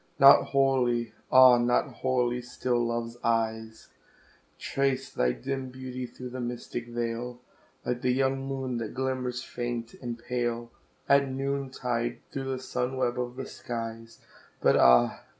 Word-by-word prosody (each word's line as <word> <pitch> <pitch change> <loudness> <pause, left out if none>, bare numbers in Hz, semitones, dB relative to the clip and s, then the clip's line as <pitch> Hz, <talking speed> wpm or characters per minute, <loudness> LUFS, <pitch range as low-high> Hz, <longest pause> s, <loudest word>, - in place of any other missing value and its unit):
Not 140 +1 +8
wholly 125 -4 +1 0.2
ah! 130 -1 +8
not 120 +1 +1
wholly 125 -1 0
still 120 -1 -1
Love's 115 0 -3
eyes 110 -1 -1 0.7
Trace 135 -1 -1
thy 60 0 +2
dim 135 - -4
beauty 130 -1 -6
through 125 +1 -9
the 130 - -5
mystic 120 0 -5
veil, 120 +1 -3 0.5
Like 125 0 -2
the 125 - +1
young 135 +1 +1
moon 135 -2 -3
that 110 -2 -5
glimmers 130 -1 -2
faint 120 -1 -4
and 120 -1 -6
pale, 120 -1 -3 0.4
At 140 -1 +4
noontide 130 -3 -2
through 135 -2 -4
the 135 -1 -2
sun 130 0 -3
web 125 -1 0
of 125 0 -3
the 135 - -5
skies; 115 -1 -6 0.4
But - - +4
ah! 60 0 +5
125 Hz, 140 wpm, -28 LUFS, 120-130 Hz, 0.7 s, Not